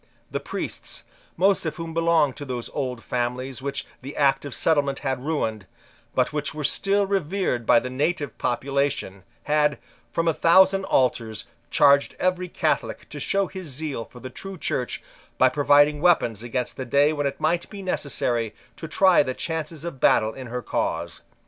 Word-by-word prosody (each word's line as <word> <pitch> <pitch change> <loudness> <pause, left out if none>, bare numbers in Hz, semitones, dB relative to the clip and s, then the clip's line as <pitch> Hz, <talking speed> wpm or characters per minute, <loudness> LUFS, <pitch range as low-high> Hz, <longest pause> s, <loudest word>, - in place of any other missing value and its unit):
The - - -1
priests, - - -4 0.3
most 195 +3 +3
of 155 - -3
whom 165 -1 -6
belonged 165 -4 +3
to 145 - -6
those 125 -4 -5
old 125 -4 -3
families 125 +1 -2
which 140 +1 -3 0.2
the 135 +3 -8
Act 135 -1 +3
of 140 - -5
Settlement 145 -4 +2
had 130 -2 -2
ruined, 110 - -2 0.5
but - - +1
which 150 -1 -2
were 150 - -4
still 200 +6 +2
revered 190 - -1
by 120 - +7
the 125 - -5
native 145 +2 -1
population, 140 -6 -1 0.2
had, 150 -1 +2 0.3
from 165 +5 0
a 165 - +4
thousand 190 +4 +5
altars, 115 - +1 0.2
charged 140 0 +4
every 185 0 0
Catholic - - -1
to - - -7
show 195 0 +1
his 185 -2 -8
zeal 140 -4 -4
for 125 - -14
the 130 +1 -8
true 195 +5 -8
Church 125 -5 -2 0.3
by 130 - +5
providing 145 +2 +4
weapons 135 - +3
against 120 +1 -3
the 130 - -4
day 140 +5 +3
when 145 -2 0
it 140 - -5
might 165 +3 0
be 200 -2 -8
necessary 120 - -1 0.2
to 160 - -6
try 185 +2 +5
the 130 -3 -2
chances 160 -1 -4
of 170 -6 -6
battle 110 -2 +4
in 130 -2 -8
her 125 +1 -4
cause. - - -2
145 Hz, 175 wpm, -24 LUFS, 125-165 Hz, 0.5 s, by